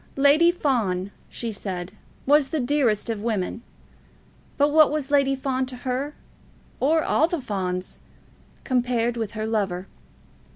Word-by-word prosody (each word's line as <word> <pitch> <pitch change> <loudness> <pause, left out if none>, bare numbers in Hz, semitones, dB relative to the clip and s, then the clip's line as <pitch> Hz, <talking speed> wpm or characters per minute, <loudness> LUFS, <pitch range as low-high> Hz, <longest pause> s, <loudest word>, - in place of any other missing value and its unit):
Lady 285 +5 +5
Fawn, 215 - -1 0.2
she 230 -1 -4
said, 185 -3 -5 0.3
was 290 0 +4
the 315 - -2
dearest 245 -5 +1
of 225 -3 -3
women; 215 -1 -2 1.0
but 285 +1 +4
what 310 0 +6
was 295 -1 -3
Lady 275 -1 +3
Fawn 260 -1 -1
to 255 - -8
her, 260 +4 -3 0.6
or 315 +3 +3
all 320 - +3
the 345 -1 -2
Fawns, 185 -6 -4 0.6
compared 240 -2 0
with 225 -2 -3
her 215 -1 -3
lover? 195 -5 -1
250 Hz, 135 wpm, -24 LUFS, 210-285 Hz, 1.0 s, what